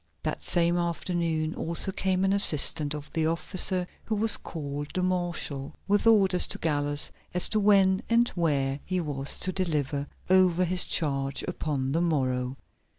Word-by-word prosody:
That - - -3
same 175 0 +3
afternoon 170 -2 -2
also 170 +4 -1
came 190 -1 0
an 195 - +2
assistant 150 -5 +2
of 150 -1 -10
the 160 -1 0
officer, 180 +2 0 0.2
who 220 - -2
was 220 +1 +5
called 145 -2 -4
the 185 - 0
Marshal, 175 -6 -3
with 205 +3 +1
orders 195 -5 +4
to - - -1
Gallus 145 -2 0 0.2
as 180 - +4
to 215 - +1
when 195 -2 +3
and 235 +1 +3
where 145 -5 -1
he 185 0 -2
was 140 -4 0
to 185 - 0
deliver 150 -6 -2 0.2
over 185 -1 +3
his 180 +1 +2
charge 135 -3 -1
upon 135 -4 -3
the 165 +4 0
morrow. 130 -5 -1
170 Hz, 155 wpm, -27 LUFS, 145-185 Hz, 0.2 s, was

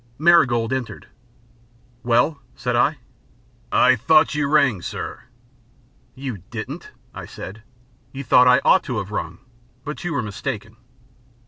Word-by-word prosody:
Marigold 130 -8 +4
entered. 130 -3 -5 1.0
"Well?" 125 +4 +1
said 125 0 -2
I. 145 +6 +2 0.7
"I 130 0 +5
thought 155 +8 +3
you 150 -1 0
rang, 140 - +3
sir." - - -6 0.9
"You 130 -6 -6
didn't," - - -7 0.2
I - - -8
said. 95 +5 -9 0.5
"You 135 +1 -7
thought 125 0 +5
I 125 +1 +5
ought 190 - +5
to 125 -7 -3
have 100 -1 -4
rung, - - -5 0.4
But 150 0 -6
you 175 -2 -3
were 135 -4 -1
mistaken." 110 +1 -6
125 Hz, 130 wpm, -22 LUFS, 115-145 Hz, 1.0 s, I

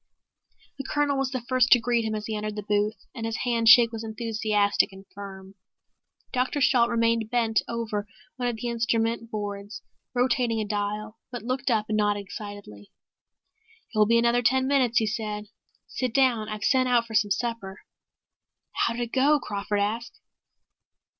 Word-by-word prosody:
The - - -3
Colonel 285 0 0
was 270 -1 0
the 260 -2 -3
first 255 -1 +3
to 245 - +5
greet 235 0 +1
him 220 0 -2
as 210 0 -4
he 220 - -3
entered 210 0 -4
the 210 - -5
booth, 210 +1 -1
and 230 - -7
his 225 0 -3
handshake 235 0 +6
was 225 -1 -6
enthusiastic 215 -2 0
and 195 0 -13
firm. 195 -1 -9 0.8
Dr. 255 +3 0
Shalt 245 -3 +4
remained 230 -1 +1
bent 230 -2 +1
over 215 -3 -3 0.3
one 250 -1 -2
of 240 - -3
the 225 +2 -5
instrument 230 0 0
boards 205 -1 -6 0.3
rotating 245 -2 +1
a 215 - -1
dial, 210 +1 -3
but 245 -2 -6
looked 255 +2 -2
up 220 -3 +1
and 215 - 0
nodded 205 -1 +1
excitedly. 205 - -9 1.0
"It - - -12
will 210 - +5
be 230 +1 +4
another 235 +1 +3
ten 260 +2 +2
minutes," 260 -3 +2
he 225 - +4
said. 210 -1 -4 0.4
"Sit 255 -3 -4
down. 245 -5 +2
I've 215 -1 -5
sent 260 -2 +3
out 240 -1 +3
for 225 - -10
some 210 -1 +3
supper." 205 -3 -3 0.9
"How - - 0
did 240 - -2
it 235 - -6
go?" 285 +3 +4
Crawford 205 -3 -2
asked. 225 +4 -3
225 Hz, 175 wpm, -26 LUFS, 210-245 Hz, 1.0 s, handshake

